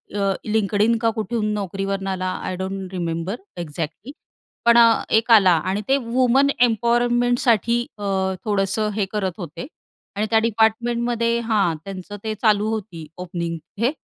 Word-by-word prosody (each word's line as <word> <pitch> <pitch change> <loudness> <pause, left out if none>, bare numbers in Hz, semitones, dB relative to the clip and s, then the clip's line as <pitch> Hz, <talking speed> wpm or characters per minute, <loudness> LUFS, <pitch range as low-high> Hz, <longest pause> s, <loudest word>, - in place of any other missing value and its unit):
अ, 200 -1 +1 0.2
LinkedIn 215 +1 +2
का 230 - +3
कुठून, 215 0 -1
Naukriवरून 195 0 -3
आला 185 -1 -2
आय 185 - -3
डोंट 190 0 -5
रिमेंबर 170 +3 -3 0.3
एक्झॅक्टली, 165 - -6 0.5
पण 235 0 +6
अ, 230 -1 +6
एक 225 +2 +2
आला 195 -5 +7 0.2
आणि 200 +2 -1
ते 270 - +4
वुमन 255 +3 +3
एम्पॉवरमेंटसाठी 240 0 +2
अ, 205 - -8 0.4
थोडंसं 205 +1 0
हे 210 -2 +1
करत 195 -4 -1
होते. 175 - -7 0.5
आणि 215 - +1
त्या 225 - +4
डिपार्टमेंटमध्ये 235 +1 +1
हां, 205 -7 +2
त्यांचं 195 +1 -7
ते 220 - -2
चालू 215 -2 +3
होती 185 -8 -5 0.2
ओपनिंग 170 -1 -4 0.2
हे. 240 +3 +2
215 Hz, 140 wpm, -22 LUFS, 190-235 Hz, 0.5 s, आला